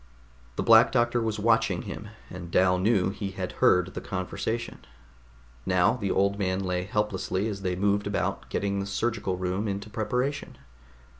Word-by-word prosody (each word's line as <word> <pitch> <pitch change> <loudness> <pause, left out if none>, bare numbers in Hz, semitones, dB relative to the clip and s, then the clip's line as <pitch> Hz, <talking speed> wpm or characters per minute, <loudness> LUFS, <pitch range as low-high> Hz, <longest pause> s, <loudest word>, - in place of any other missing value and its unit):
The - - -1
Black - - +7
Doctor 120 0 +2
was 110 -1 -1
watching 110 -4 +2
him, 105 - -7 0.2
and 90 -1 -7
Dal 90 +1 +3
knew 95 -1 +2
he 100 -1 -4
had 95 -1 -4
heard 90 +1 +4
the - - -5
conversation. 110 +5 -4 0.8
Now 90 - +3
the 100 -5 -3
old 100 +2 +1
man 95 -1 0
lay 90 -1 -1
helplessly 100 -1 -1
as 100 -3 -4
they 90 -1 -1
moved 100 +2 +1
about 100 - -2
getting 100 0 -1
the 100 - -3
surgical 100 -3 -1
room 95 +3 -2
into 100 +1 -4
preparation. 125 +7 -2
100 Hz, 160 wpm, -27 LUFS, 95-110 Hz, 0.8 s, Black